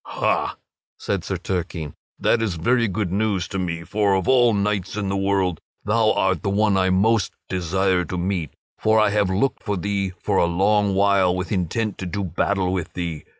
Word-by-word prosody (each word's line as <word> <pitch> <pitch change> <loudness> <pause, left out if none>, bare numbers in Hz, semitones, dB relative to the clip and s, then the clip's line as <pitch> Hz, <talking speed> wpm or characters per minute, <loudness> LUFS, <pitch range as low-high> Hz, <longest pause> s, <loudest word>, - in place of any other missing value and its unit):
"Ha!" - - -1 0.4
said - - -2
Sir - - -3
Turquine, 85 -5 -4 0.2
"that 115 - +2
is 105 -6 -1
very 115 +8 +2
good 100 -2 -2
news 100 -3 0
to 95 - -3
me, 85 -2 -3
for 100 +2 +1
of 95 - -1
all 125 -2 +5
knights 100 -2 -1
in 100 -2 -2
the 100 - -1
world 95 -3 0 0.3
thou 110 +1 +3
art 95 -4 +1
the - - -1
one 105 0 +2
I 95 -1 +2
most 100 +2 +2
desire 95 +1 0
to 90 - -5
meet, 90 -4 -2 0.2
for 110 0 +3
I 110 -1 +3
have 105 -2 +1
looked 105 +9 0
for 100 -2 -2
thee 100 0 -2
for 100 -2 0
a - - +4
long 100 +3 +2
while 100 -2 +3
with 90 0 -4
intent 100 +3 -1
to 95 - -4
do 100 +3 -3
battle 95 +1 0
with 90 -4 -3
thee. 85 -4 -4
95 Hz, 195 wpm, -22 LUFS, 90-105 Hz, 0.4 s, all